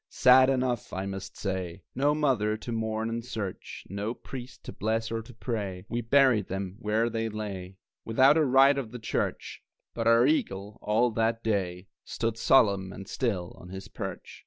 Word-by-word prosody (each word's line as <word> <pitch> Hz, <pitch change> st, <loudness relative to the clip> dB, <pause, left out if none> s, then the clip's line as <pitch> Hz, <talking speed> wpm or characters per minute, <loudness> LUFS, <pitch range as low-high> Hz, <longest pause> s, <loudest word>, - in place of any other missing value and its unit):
Sad 130 Hz, +1 st, +6 dB
enough, 130 Hz, -3 st, -1 dB
I 95 Hz, +1 st, -3 dB
must 95 Hz, 0 st, -6 dB
say. 95 Hz, -2 st, -4 dB
No 145 Hz, +3 st, +2 dB
mother 120 Hz, -8 st, +1 dB
to 120 Hz, -, -7 dB
mourn 110 Hz, -1 st, -1 dB
and 115 Hz, 0 st, -3 dB
search, 110 Hz, -6 st, -6 dB
No 100 Hz, +5 st, -3 dB
priest 130 Hz, -1 st, -9 dB
to -, -, -8 dB
bless 110 Hz, +2 st, -1 dB
or 115 Hz, 0 st, -2 dB
to 115 Hz, -, -13 dB
pray 105 Hz, -6 st, -4 dB
We 120 Hz, -, -1 dB
buried 120 Hz, -4 st, +4 dB
them 95 Hz, 0 st, -4 dB
where 110 Hz, +2 st, +1 dB
they 115 Hz, -1 st, -2 dB
lay, 100 Hz, -3 st, -6 dB, 0.3 s
Without 130 Hz, +6 st, +5 dB
a 160 Hz, -, +4 dB
rite 135 Hz, +1 st, +5 dB
of 125 Hz, -5 st, -5 dB
the 125 Hz, -, -7 dB
church 115 Hz, -, -3 dB, 0.3 s
But 115 Hz, -1 st, -2 dB
our 115 Hz, +1 st, +6 dB
eagle, 105 Hz, -8 st, -1 dB
all 110 Hz, +3 st, +2 dB
that 115 Hz, +1 st, 0 dB
day, 95 Hz, -4 st, -1 dB, 0.2 s
Stood 115 Hz, 0 st, -3 dB
solemn 100 Hz, -8 st, +4 dB
and 95 Hz, 0 st, -9 dB
still 100 Hz, -8 st, -2 dB
on 90 Hz, -, -12 dB
his 95 Hz, +1 st, -8 dB
perch. -, -, -7 dB
110 Hz, 180 wpm, -28 LUFS, 100-125 Hz, 0.3 s, Sad